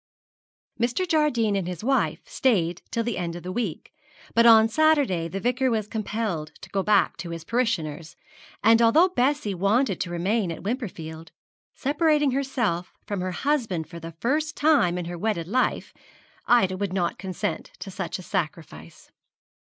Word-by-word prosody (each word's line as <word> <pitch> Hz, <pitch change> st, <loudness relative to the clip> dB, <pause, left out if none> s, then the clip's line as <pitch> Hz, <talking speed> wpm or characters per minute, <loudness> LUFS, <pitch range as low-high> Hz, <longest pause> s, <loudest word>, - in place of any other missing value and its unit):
Mr. 245 Hz, +10 st, 0 dB
Jardine 270 Hz, -10 st, +2 dB
and 190 Hz, -3 st, -1 dB
his 180 Hz, +1 st, -6 dB
wife 270 Hz, +3 st, +1 dB
stayed 190 Hz, -, +1 dB
till 230 Hz, -, -1 dB
the 235 Hz, -3 st, -2 dB
end 170 Hz, -1 st, -3 dB
of 175 Hz, -, -8 dB
the 180 Hz, -, -5 dB
week, 205 Hz, -5 st, -4 dB, 0.4 s
but 230 Hz, +1 st, +5 dB
on 225 Hz, -1 st, +8 dB
Saturday 275 Hz, -, +2 dB
the 195 Hz, +4 st, -4 dB
Vicar 250 Hz, +4 st, +1 dB
was 220 Hz, -3 st, -1 dB
compelled 210 Hz, -8 st, -3 dB
to -, -, -12 dB
go 195 Hz, -, 0 dB
back 205 Hz, +1 st, +2 dB
to 175 Hz, -, -6 dB
his 165 Hz, -1 st, -6 dB
parishioners; 170 Hz, -, -2 dB, 0.5 s
and 225 Hz, +2 st, +6 dB
although 310 Hz, +11 st, +5 dB
Bessie 270 Hz, -, 0 dB
wanted 200 Hz, +4 st, +1 dB
to 175 Hz, -, -2 dB
remain 185 Hz, +3 st, 0 dB
at 165 Hz, -, -7 dB
Wimperfield, 170 Hz, -8 st, -5 dB, 0.5 s
separating 295 Hz, 0 st, +2 dB
herself 245 Hz, -10 st, -1 dB
from 200 Hz, -3 st, -3 dB
her 185 Hz, -, -2 dB
husband 220 Hz, -, -1 dB
for 170 Hz, +1 st, -9 dB
the 165 Hz, 0 st, -8 dB
first 300 Hz, -, -1 dB
time 290 Hz, -, +3 dB
in 175 Hz, -, -3 dB
her 175 Hz, 0 st, -6 dB
wedded 190 Hz, -5 st, -1 dB
life, 255 Hz, +7 st, 0 dB, 0.5 s
Ida 190 Hz, -6 st, +4 dB
would 200 Hz, -1 st, -2 dB
not 180 Hz, -3 st, -1 dB
consent 195 Hz, +2 st, -4 dB
to 195 Hz, -, -8 dB
such 185 Hz, -1 st, -4 dB
a 185 Hz, -, -10 dB
sacrifice. 165 Hz, -2 st, -5 dB
210 Hz, 165 wpm, -25 LUFS, 175-250 Hz, 0.5 s, on